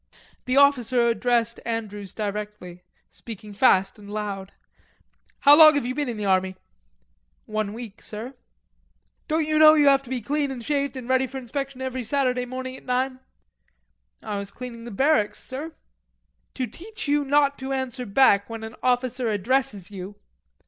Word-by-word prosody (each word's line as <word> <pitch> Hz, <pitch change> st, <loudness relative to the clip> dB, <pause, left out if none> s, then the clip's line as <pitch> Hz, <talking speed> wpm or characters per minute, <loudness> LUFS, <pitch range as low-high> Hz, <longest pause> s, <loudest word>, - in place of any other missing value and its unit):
The 255 Hz, +1 st, 0 dB
officer 255 Hz, -4 st, +4 dB
addressed 235 Hz, 0 st, +1 dB
Andrews 210 Hz, -4 st, -4 dB
directly, 205 Hz, -4 st, -5 dB, 0.3 s
speaking 210 Hz, -2 st, -10 dB
fast 195 Hz, -3 st, +3 dB
and 205 Hz, -1 st, -12 dB
loud. 200 Hz, -2 st, -4 dB, 0.9 s
"How 285 Hz, +1 st, +8 dB
long 310 Hz, -1 st, +9 dB
have 285 Hz, -, 0 dB
you 250 Hz, -, -2 dB
been 290 Hz, -1 st, -2 dB
in 230 Hz, -, -4 dB
the 210 Hz, -, -3 dB
army?" 190 Hz, -1 st, +1 dB, 0.9 s
"One 215 Hz, -1 st, -2 dB
week, 225 Hz, -1 st, -9 dB
sir." 225 Hz, +5 st, -7 dB, 0.9 s
"Don't 315 Hz, 0 st, +1 dB
you 310 Hz, 0 st, +1 dB
know 310 Hz, 0 st, +9 dB
you 295 Hz, -2 st, +4 dB
have 275 Hz, -1 st, +4 dB
to 265 Hz, -, -15 dB
be 260 Hz, -1 st, -2 dB
clean 285 Hz, +5 st, -1 dB
and 250 Hz, -4 st, -7 dB
shaved 280 Hz, -2 st, -1 dB
and 250 Hz, -2 st, -7 dB
ready 260 Hz, 0 st, +2 dB
for 265 Hz, -, -8 dB
inspection 265 Hz, +1 st, -5 dB
every 260 Hz, -1 st, -3 dB
Saturday 250 Hz, 0 st, 0 dB
morning 260 Hz, +1 st, -6 dB
at -, -, -17 dB
nine?" 255 Hz, +1 st, -1 dB, 1.0 s
"I 205 Hz, -1 st, -3 dB
was 200 Hz, 0 st, -6 dB
cleaning 235 Hz, 0 st, -9 dB
the -, -, -6 dB
barracks, 235 Hz, -1 st, +1 dB
sir." 295 Hz, +5 st, -7 dB, 0.8 s
"To 255 Hz, -, -1 dB
teach 430 Hz, -, -8 dB
you 290 Hz, 0 st, +2 dB
not 285 Hz, 0 st, +2 dB
to 265 Hz, 0 st, -5 dB
answer 260 Hz, -2 st, -3 dB
back 200 Hz, -1 st, +4 dB
when 225 Hz, -1 st, -6 dB
an 220 Hz, +1 st, -7 dB
officer 250 Hz, -1 st, 0 dB
addresses 210 Hz, -2 st, -1 dB
you...." 195 Hz, +1 st, -8 dB
250 Hz, 165 wpm, -24 LUFS, 210-275 Hz, 1.0 s, long